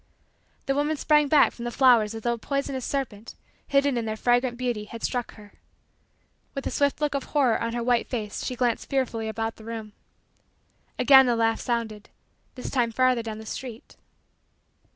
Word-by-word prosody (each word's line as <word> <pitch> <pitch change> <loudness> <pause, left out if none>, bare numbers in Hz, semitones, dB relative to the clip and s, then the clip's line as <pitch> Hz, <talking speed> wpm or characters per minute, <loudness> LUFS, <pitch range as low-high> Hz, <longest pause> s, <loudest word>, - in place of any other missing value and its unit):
The 275 - +1
woman 295 +2 0
sprang 300 0 +3
back 290 0 +5
from 235 - -9
the 240 - -2
flowers 235 -4 +4
as 225 - -7
though 240 - +1
a - - -4
poisonous 275 0 -3
serpent, 235 -6 -4 0.3
hidden 275 -2 +2
in 230 - -3
their 220 0 -3
fragrant 245 +1 +1
beauty, 240 -4 -2
had 230 +2 -10
struck 245 -1 -2
her. 210 -2 -15 1.0
With 275 - -4
a - - -2
swift 285 -1 +1
look 295 -1 0
of 280 -2 -2
horror 265 -6 +1
on 230 0 -2
her 240 0 -2
white 240 0 +1
face 215 -5 -4
she 250 - -3
glanced 240 -2 -1
fearfully 245 -5 -1
about 225 +1 -3
the 220 - -13
room. 220 -2 -7 1.0
Again 265 -2 +7
the 240 - +2
laugh 225 0 +1
sounded; 225 -3 -3 0.5
this 250 - -6
time 240 -3 +1
farther 255 0 +2
down 220 -1 -6
the 220 - -10
street. 235 0 -8
240 Hz, 185 wpm, -26 LUFS, 225-270 Hz, 1.0 s, Again